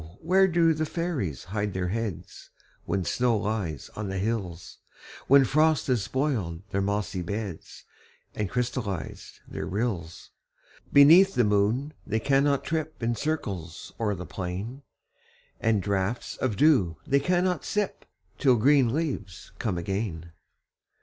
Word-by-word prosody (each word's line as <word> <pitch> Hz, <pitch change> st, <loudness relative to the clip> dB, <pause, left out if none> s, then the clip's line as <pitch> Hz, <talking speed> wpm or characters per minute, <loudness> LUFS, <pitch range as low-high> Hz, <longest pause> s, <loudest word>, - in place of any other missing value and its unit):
where 190 Hz, +3 st, +4 dB
do 165 Hz, -2 st, +3 dB
fairies 155 Hz, -, -3 dB
hide 105 Hz, +1 st, -3 dB
their 90 Hz, -1 st, -1 dB
heads, 110 Hz, -4 st, -5 dB, 0.4 s
When 95 Hz, -2 st, -1 dB
snow 120 Hz, -2 st, +1 dB
lies 100 Hz, -8 st, -3 dB
on 105 Hz, -2 st, -4 dB
the 95 Hz, -, -3 dB
hills, 95 Hz, -5 st, -3 dB, 0.5 s
When 140 Hz, 0 st, +7 dB
frost 155 Hz, +3 st, +3 dB
has 125 Hz, -5 st, +1 dB
spoiled 105 Hz, -, -2 dB
their 100 Hz, -, 0 dB
mossy 100 Hz, -1 st, -1 dB
beds, 100 Hz, -1 st, -6 dB, 0.5 s
And 105 Hz, -3 st, -2 dB
crystallized 120 Hz, -6 st, -4 dB
their -, -, -5 dB
rills? 95 Hz, -6 st, -3 dB, 0.6 s
Beneath 170 Hz, +8 st, +7 dB
the 125 Hz, -, +4 dB
moon 105 Hz, +8 st, +1 dB
they 110 Hz, -, -1 dB
cannot 140 Hz, +2 st, +2 dB
trip 155 Hz, -5 st, -3 dB
In 115 Hz, 0 st, +1 dB
circles 100 Hz, -, -4 dB
o'er 105 Hz, -3 st, 0 dB
the 90 Hz, 0 st, -7 dB
plain; 95 Hz, +11 st, -5 dB, 0.8 s
And 110 Hz, -4 st, +1 dB
draughts 100 Hz, +4 st, -1 dB
of 115 Hz, -6 st, -1 dB
dew 110 Hz, -, +4 dB
they 140 Hz, -, +3 dB
cannot 180 Hz, +4 st, +1 dB
sip, 210 Hz, -1 st, -2 dB, 0.3 s
Till 130 Hz, -4 st, +5 dB
green 130 Hz, +1 st, +4 dB
leaves 140 Hz, -, -4 dB
come 100 Hz, -6 st, -1 dB
again. 85 Hz, -2 st, -3 dB
110 Hz, 130 wpm, -27 LUFS, 95-140 Hz, 0.8 s, When